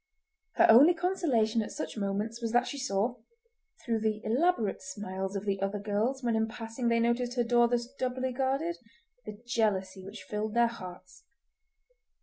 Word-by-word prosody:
Her - - +6
only 280 +10 +8
consolation 275 - +1
at 215 - -5
such - - -5
moments 210 +3 -3
was 230 -1 -2
that 245 +1 +4
she 285 - -5
saw, 235 0 -1 0.7
through 230 -2 0
the 215 -1 0
elaborate 240 - +1
smiles 190 0 -5
of 200 +1 -3
the 195 -1 -1
other 195 +1 -1
girls 215 +6 -1
when 235 -2 +1
in 220 0 +1
passing 230 +1 -5
they 230 0 +3
noticed 240 +1 0
her 240 - +2
door 240 0 +4
thus 240 0 0
doubly 255 0 -3
guarded, 275 +6 -1 0.5
the 210 -1 -7
jealousy 195 -5 0
which 200 +3 -9
filled 210 +1 -4
their 235 0 +5
hearts. 185 -5 -8
230 Hz, 165 wpm, -30 LUFS, 205-245 Hz, 0.7 s, only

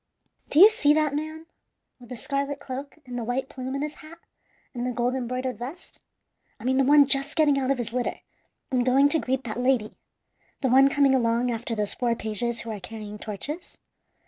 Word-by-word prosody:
"Do - - -2
you 405 +6 +10
see 300 -8 +3
that 305 -2 +1
man 310 +2 -4 0.5
with 245 - -15
the 250 - -6
scarlet 280 +2 -2
cloak, 275 +2 -7
and 250 -1 -8
the - - -3
white 250 +4 -2
plume 260 0 -5
in 275 - -2
his 300 0 -4
hat, 315 +2 -12 0.6
and 240 -2 -4
the 250 - -1
gold 245 +1 0
embroidered 255 0 -3
vest? 275 +9 -9 0.6
I - - -12
mean 260 +1 +1
the 270 - +4
one 285 +1 +6
just 275 +2 0
getting 295 -3 +3
out 260 -1 -1
of 275 - +2
his 235 -2 -4
litter 250 -1 -2 0.5
and 250 -2 +2
going 270 +3 +4
to 320 - +2
greet 265 -1 -2
that 225 0 -5
lady 250 -4 +1 0.7
the 265 - +1
one 270 +2 +6
coming 275 -1 +3
along 240 -1 +1
after 230 0 -3
those 210 -2 0
four 240 -2 0
pages 225 +2 -2
who 230 - -6
are 210 - -5
carrying 210 +1 -8
torches? 250 - -6
260 Hz, 205 wpm, -25 LUFS, 240-280 Hz, 0.7 s, you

